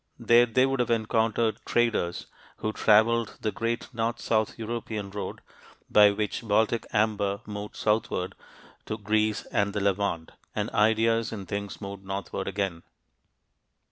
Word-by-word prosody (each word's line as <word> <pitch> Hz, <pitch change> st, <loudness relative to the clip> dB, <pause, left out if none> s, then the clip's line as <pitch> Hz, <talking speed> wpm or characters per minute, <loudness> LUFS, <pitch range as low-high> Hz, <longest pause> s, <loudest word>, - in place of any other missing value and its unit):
There 120 Hz, +1 st, +5 dB
they 130 Hz, +3 st, +3 dB
would 135 Hz, 0 st, -1 dB
have 120 Hz, -, +1 dB
encountered 110 Hz, -1 st, +1 dB
traders 115 Hz, -7 st, 0 dB, 0.3 s
who 110 Hz, -, -2 dB
traveled 110 Hz, +2 st, +3 dB
the 110 Hz, -, 0 dB
great 115 Hz, +2 st, -2 dB
north 115 Hz, 0 st, -1 dB
south 110 Hz, -1 st, 0 dB
European 110 Hz, -3 st, -4 dB
road, 105 Hz, +1 st, -5 dB, 0.5 s
by 105 Hz, -1 st, +8 dB
which 105 Hz, +1 st, -2 dB
Baltic 110 Hz, +1 st, +1 dB
amber 105 Hz, -2 st, +1 dB
moved 105 Hz, 0 st, -6 dB
southward 105 Hz, -4 st, 0 dB, 0.5 s
to 110 Hz, -, -3 dB
Greece 110 Hz, 0 st, 0 dB
and 100 Hz, 0 st, +1 dB
the 105 Hz, -, -1 dB
Levant, 100 Hz, -4 st, 0 dB, 0.2 s
and -, -, -2 dB
ideas 115 Hz, +1 st, +2 dB
and 100 Hz, -4 st, -6 dB
things 100 Hz, -1 st, -4 dB
moved 100 Hz, -1 st, -7 dB
northward 95 Hz, 0 st, -4 dB
again. 95 Hz, -4 st, -2 dB
110 Hz, 140 wpm, -27 LUFS, 100-115 Hz, 0.5 s, by